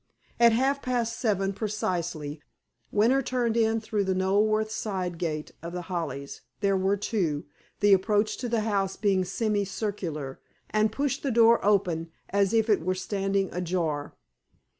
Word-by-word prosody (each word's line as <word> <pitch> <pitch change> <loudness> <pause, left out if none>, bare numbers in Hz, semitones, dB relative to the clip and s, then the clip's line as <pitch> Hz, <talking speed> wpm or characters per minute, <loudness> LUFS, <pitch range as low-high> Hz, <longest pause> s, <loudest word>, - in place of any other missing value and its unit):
At 235 -1 +7
half 270 +4 +1
past 235 -2 -1
seven 195 -4 +1
precisely, 175 -8 -3 0.5
Winter 235 +6 +3
turned 245 -3 0
in 225 -1 +2
through 215 -2 -1
the 190 -1 0
Knoleworth 215 +3 +2
side 185 -6 -3
gate 155 -3 -3
of 170 +1 -7
The 180 0 -4
Hollies 140 -5 -4 0.2
(there 200 -1 +2
were 190 +2 +1
two, 175 -8 -1 0.4
the 205 -1 +6
approach 205 +2 +2
to 245 - -4
the 230 -1 +1
house 200 -3 0
being 195 -3 +2
semi 205 +2 0
circular) 180 -9 -4 0.3
and 215 0 +2
pushed 275 +3 -1
the 280 - -1
door 230 -1 +5
open, 185 -5 +1 0.2
as 200 0 +2
it 220 -5 +2
was 185 +1 -1
standing 195 0 -1
ajar. 165 -5 -2
200 Hz, 150 wpm, -27 LUFS, 180-220 Hz, 0.5 s, At